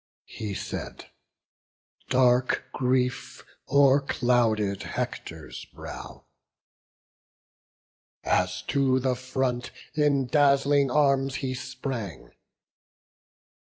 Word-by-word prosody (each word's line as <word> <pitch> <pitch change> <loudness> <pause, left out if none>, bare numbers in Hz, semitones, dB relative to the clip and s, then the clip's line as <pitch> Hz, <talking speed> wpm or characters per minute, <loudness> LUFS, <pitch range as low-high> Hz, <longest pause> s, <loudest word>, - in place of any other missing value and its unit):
He 105 -3 -6
said; - - -6 1.0
dark 125 -1 +3
grief 125 0 -1 0.3
o'erclouded 120 -7 +3
Hector's - - -5
brow, - - -10 2.0
As 90 0 0
to 130 +4 +2
the 130 0 +1
front 130 -1 -2 0.2
in 145 -3 +2
dazzling 140 0 +3
arms 135 -1 +2
he 130 -2 -2
sprang. 130 - -6
130 Hz, 70 wpm, -26 LUFS, 120-140 Hz, 2.0 s, dark